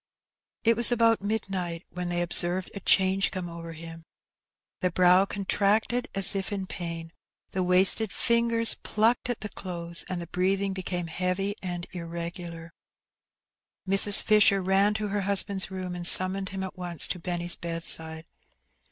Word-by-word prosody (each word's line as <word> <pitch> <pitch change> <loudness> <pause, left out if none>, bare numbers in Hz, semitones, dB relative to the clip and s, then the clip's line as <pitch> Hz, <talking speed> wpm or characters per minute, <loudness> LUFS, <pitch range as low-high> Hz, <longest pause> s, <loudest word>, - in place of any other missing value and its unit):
It 230 0 +3
was 235 +2 +6
about 230 -2 +2
midnight 190 -5 -4
when 180 0 -5
they 175 0 -1
observed 175 +1 +1
a - - -7
change 190 0 +3
come 185 -3 -6
over 170 -1 -9
him. 165 0 -10 0.8
The 185 - 0
brow 180 +2 +4
contracted 205 +5 0
as 195 -1 +3
if 195 +1 -3
in 195 -2 -3
pain, 165 -2 -7 0.4
the 185 - -2
wasted 185 +4 +4
fingers 235 -1 +1
plucked 230 +3 0
at 245 - -3
the 215 - -5
clothes, 170 -3 -3
and 185 -1 -3
the 170 - -6
breathing 190 +3 -1
became 180 -2 -4
heavy 185 +4 -2
and 175 -2 -5
irregular. 170 -1 -8 1.1
Mrs. 195 +1 +4
Fisher 210 -2 +4
ran 195 +2 +1
to 210 -1 -3
her 205 0 -2
husband's 195 0 +1
room, 185 -1 -6
and 175 -1 +1
summoned 185 +1 +4
him 190 0 -5
at 190 - -7
once 175 -3 0
to 180 - -4
Benny's 175 0 -1
bedside. 165 -1 -1
185 Hz, 150 wpm, -26 LUFS, 175-200 Hz, 1.1 s, was